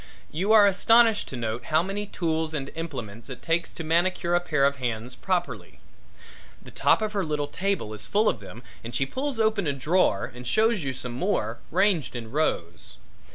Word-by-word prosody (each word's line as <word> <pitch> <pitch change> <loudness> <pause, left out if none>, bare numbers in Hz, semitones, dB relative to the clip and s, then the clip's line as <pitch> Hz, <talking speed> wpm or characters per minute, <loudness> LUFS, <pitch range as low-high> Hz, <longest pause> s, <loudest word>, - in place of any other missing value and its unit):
You 190 +7 0
are 215 -2 +8
astonished 225 +3 +4
to - - -7
note 115 0 -3
how 155 +1 +2
many 200 +2 -4
tools 160 -3 -2
and 135 -2 -4
implements 125 -9 -6
it 130 - -8
takes 165 +1 0
to 165 - -6
manicure 170 +2 +1
a 175 - +5
pair 150 -5 +1
of 140 0 +1
hands 120 -1 -3
properly. 180 +4 -3 0.8
The - - -14
top - - +3
of 215 0 -2
her 200 -2 0
little 150 -2 -1
table 185 - -2
is 105 0 -8
full 210 +2 +2
of - - +1
them 120 - -11 0.2
and 115 +1 -7
she 135 - +1
pulls 260 - -3
open 215 -5 +1
a 140 - +1
drawer 140 - +1
and 125 0 -9
shows 220 - +2
you 135 -1 -2
some 125 -1 -6
more, 120 - -1
ranged 185 -7 +1
in 115 -2 -6
rows. 85 - -2
160 Hz, 195 wpm, -26 LUFS, 125-195 Hz, 0.8 s, are